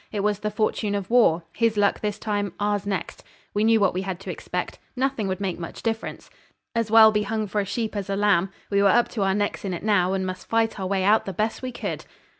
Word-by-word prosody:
It 205 - -2
was 205 0 0
the 215 - -2
fortune 210 -1 -1
of 200 +1 -4
war; 200 -9 +4
his 230 -2 +1
luck 205 -1 +2
this 210 -1 -2
time, 205 -2 -2
ours 205 -1 0
next. 190 -5 -4 0.3
We 205 - +1
knew 225 0 +4
what 195 -3 +3
we 185 - -1
had 190 -2 -4
to - - -5
expect. - - -5 0.2
Nothing 260 -5 0
would 190 0 -2
make 190 -4 -3
much 165 - -8
difference. 225 -1 -4 0.4
'As 230 -2 0
well 220 0 +8
be 210 -1 +1
hung 215 +1 -2
for 210 +1 -1
a - - -3
sheep 220 +2 -3
as 200 -1 -4
a 195 - 0
lamb.' 195 -2 +3 0.2
We 200 0 +3
were 200 - +5
up 240 +4 +4
to 220 - -4
our 195 -1 +2
necks 205 0 -1
in 190 -3 -2
it 170 - -8
now, 190 -4 +2
and 190 -1 -1
must 185 0 -6
fight 225 -2 +1
our 190 - -2
way 190 0 0
out 210 +3 +4
the 195 - -4
best 215 +5 -1
way 255 - -4
we 255 - -6
could. - - -4
205 Hz, 260 wpm, -24 LUFS, 195-220 Hz, 0.4 s, well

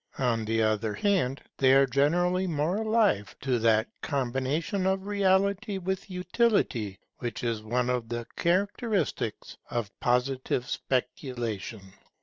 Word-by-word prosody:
On 115 -4 +1
the 115 +1 +1
other 110 -1 0
hand, 165 -11 +1 0.2
they 130 0 +6
are 135 0 +6
generally 175 +8 +2
more 160 +3 0
alive 215 - +2
to 130 -3 +1
that 110 0 +3
combination 140 - -1
of 190 0 0
reality 200 +1 +1
with 190 +1 -3
utility 180 - +1 0.2
which 120 -2 -4
is 115 -2 -1
one 120 +3 0
of 125 -2 -1
the 120 0 -3
characteristics 195 - -1
of 115 -4 -2
Positive 125 0 0
speculation. 120 -5 -3
135 Hz, 125 wpm, -28 LUFS, 120-190 Hz, 0.2 s, they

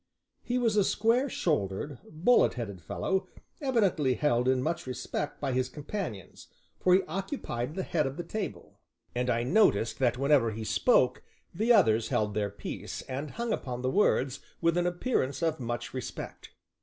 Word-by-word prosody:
He 245 +1 -1
was 230 -4 +2
a 205 - +5
square 230 +8 +2
shouldered, 130 - -1
bullet 180 +11 +3
headed 100 -7 -5
fellow, 190 - -1 0.3
evidently 195 - +2
held 125 -4 +1
in 130 0 +3
much 165 0 -2
respect 130 +3 -4
by 140 -2 -1
his 130 0 0
companions, 150 - -6 0.3
for 180 0 +5
he 190 - +3
occupied 160 - -4
the 190 - -2
head 155 -6 0
of 135 - -6
the 175 - -3
table, 215 0 -6 0.3
and 125 +1 -1
I 120 -1 +1
noticed 120 - +3
that 125 -2 +2
when 140 +3 0
ever 130 -6 +5
he 110 +1 -5
spoke 125 - +3 0.3
the 220 +7 +2
others 115 - +5
held 105 -1 0
their 105 -1 0
peace, 100 - -6
and 140 +3 -5
hung 235 - -2
upon 125 -2 -4
the 130 - +1
words 135 -9 +2 0.2
with 170 0 +2
an 175 0 +2
appearance 175 - -1
of 160 -2 +1
much 120 -1 -4
respect. 130 -1 -6
145 Hz, 170 wpm, -29 LUFS, 125-190 Hz, 0.3 s, a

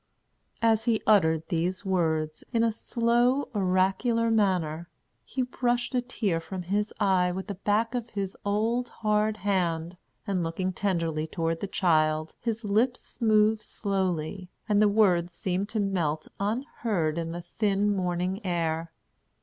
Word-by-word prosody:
As 225 -1 +3
he 230 -2 +1
uttered 160 -6 +3
these 180 +3 -1
words, 160 -4 0
in 230 -2 +2
a 230 - +3
slow, 240 +4 +1
oracular 200 +4 +2
manner, 175 -6 +1 0.3
he 260 - -2
brushed 245 0 -1
a 250 - +2
tear 215 -8 -1
from 180 +2 -6
his 205 +4 -1
eye 185 -2 +3
with 190 +1 -4
the 205 - -4
back 210 +4 0
of 240 -2 -3
his 195 -3 -4
old, 225 +4 0
hard 215 0 0
hand, 180 -4 -1 0.3
and 195 -4 0
looking 185 +3 -2
tenderly 165 -5 -1
toward 165 0 -2
the 200 - -3
child, 155 -4 +1
his 230 -1 -3
lips 240 +6 0
moved 215 -1 +4
slowly, 190 -4 -2 0.2
and 210 -1 +3
the 210 - +5
words 180 -5 +3
seemed 190 +3 -2
to 220 - -2
melt 170 -7 -1
unheard 205 - -1
in 165 0 -3
the 175 +1 -6 0.2
thin, 205 -1 +2
morning 180 +2 -1
air. 165 -2 -1
195 Hz, 145 wpm, -27 LUFS, 170-220 Hz, 0.3 s, the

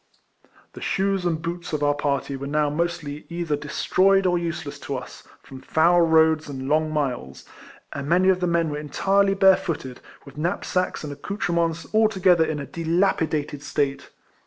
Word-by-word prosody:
The - - -10
shoes 195 -1 0
and 165 -2 0
boots 170 +1 -5
of 150 -1 -1
our 145 0 +3
parry 140 -1 -2
were 140 +1 -6
now 150 0 +1
mostly 155 -2 -3
either 170 -3 -2
destroyed 185 +6 +2
or 180 -1 +3
useless 165 -4 -5
to 140 -2 -4
us. 125 - -10 0.2
from 130 -1 -11
foul 170 +2 +3
roads 160 -1 +3
and 135 -1 -6
long 155 +2 +2
miles, 125 - -3 0.5
and 140 0 -5
many 185 +2 +4
of 185 -1 +3
the 180 - 0
men 170 -2 +1
were 145 - -3
entirely 195 +7 +1
barefooted, 180 -9 +2 0.3
with 140 +1 -11
knap 175 +5 -2
sacks 180 -3 -1
and 145 -1 -5
accoutrements 170 0 -2
altogether 190 -6 +4
in 155 -2 -2
a 140 - -5
dilapidated 165 -4 -1
state. 145 -2 -2
160 Hz, 165 wpm, -23 LUFS, 145-180 Hz, 0.5 s, many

